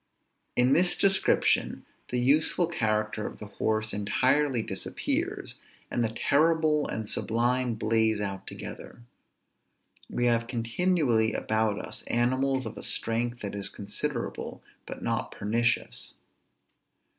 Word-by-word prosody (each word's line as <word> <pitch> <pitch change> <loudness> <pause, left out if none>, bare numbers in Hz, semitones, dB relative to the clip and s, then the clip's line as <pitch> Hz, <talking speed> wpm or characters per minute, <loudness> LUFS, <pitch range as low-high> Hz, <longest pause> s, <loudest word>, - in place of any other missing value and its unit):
In 125 +2 +4
this 175 +1 +5
description, 195 -1 +2 0.2
the 125 - 0
useful 150 +7 +3
character 110 -8 -1
of - - -9
the - - -8
horse 110 +1 -1
entirely 130 +5 +1
disappears, 95 -2 -2 0.3
and 120 - 0
the 115 - +1
terrible 155 +5 +2
and 110 -1 -4
sublime 120 +2 +1
blaze 110 -1 +2
out 100 -2 -4
together. 120 - -8 1.1
We 120 - -1
have 115 -1 +2
continually 120 -1 +1
about 110 -1 0
us - - -5
animals 130 +2 +1
of 110 - -6
a - - -7
strength 120 +1 -2
that 100 - -4
is 100 -1 0
considerable, 115 +6 -4 0.2
but - - -7
not - - -1
pernicious. 115 +3 -1
120 Hz, 120 wpm, -28 LUFS, 110-135 Hz, 1.1 s, this